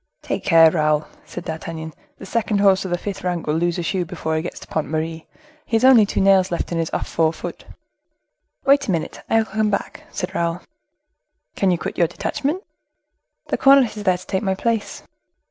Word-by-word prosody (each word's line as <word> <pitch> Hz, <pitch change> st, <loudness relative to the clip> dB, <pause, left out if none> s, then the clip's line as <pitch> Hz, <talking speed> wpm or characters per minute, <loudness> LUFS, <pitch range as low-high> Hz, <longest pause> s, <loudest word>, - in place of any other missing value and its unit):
"Take -, -, -3 dB
care, 165 Hz, -2 st, +6 dB
Raoul," 155 Hz, -2 st, +1 dB, 0.2 s
said -, -, -8 dB
D'Artagnan, 160 Hz, -1 st, -6 dB, 0.2 s
"the -, -, -10 dB
second 215 Hz, 0 st, 0 dB
horse 195 Hz, -1 st, +4 dB
of -, -, -3 dB
the 175 Hz, -, 0 dB
fifth 200 Hz, +2 st, -6 dB
rank 180 Hz, -2 st, -2 dB
will 150 Hz, -, 0 dB
lose 170 Hz, +1 st, 0 dB
a 175 Hz, -, -2 dB
shoe 185 Hz, +1 st, -1 dB
before 160 Hz, -1 st, -3 dB
he 155 Hz, -, 0 dB
gets 175 Hz, -, -6 dB
to -, -, -10 dB
the -, -, -15 dB
Pont 155 Hz, -, -1 dB
Marie; 160 Hz, +1 st, -3 dB, 0.4 s
he 230 Hz, -, -2 dB
has 225 Hz, -, +3 dB
only 240 Hz, -6 st, +7 dB
two -, -, -1 dB
nails 190 Hz, -1 st, +4 dB
left 170 Hz, -, -3 dB
in 170 Hz, -, -1 dB
his 165 Hz, -, -1 dB
off -, -, -3 dB
fore 160 Hz, -1 st, +1 dB
foot." -, -, -8 dB, 1.0 s
"Wait 275 Hz, +1 st, +4 dB
a -, -, +1 dB
minute, 165 Hz, -3 st, -3 dB
I 225 Hz, -, +3 dB
will 225 Hz, -, +2 dB
come 215 Hz, +1 st, 0 dB
back," 200 Hz, -, -4 dB
said 180 Hz, +1 st, -4 dB
Raoul. 170 Hz, -1 st, -1 dB, 0.9 s
"Can 195 Hz, -, +2 dB
you 175 Hz, -, +2 dB
quit -, -, -5 dB
your 170 Hz, -, +4 dB
detachment?" 295 Hz, -, -3 dB, 0.9 s
"The -, -, -1 dB
cornet 270 Hz, -5 st, +5 dB
is 210 Hz, -, -6 dB
there 185 Hz, -3 st, +2 dB
to 185 Hz, -, -13 dB
take 190 Hz, 0 st, -1 dB
my 190 Hz, -2 st, 0 dB
place." 225 Hz, +1 st, -2 dB
180 Hz, 215 wpm, -21 LUFS, 165-210 Hz, 1.0 s, only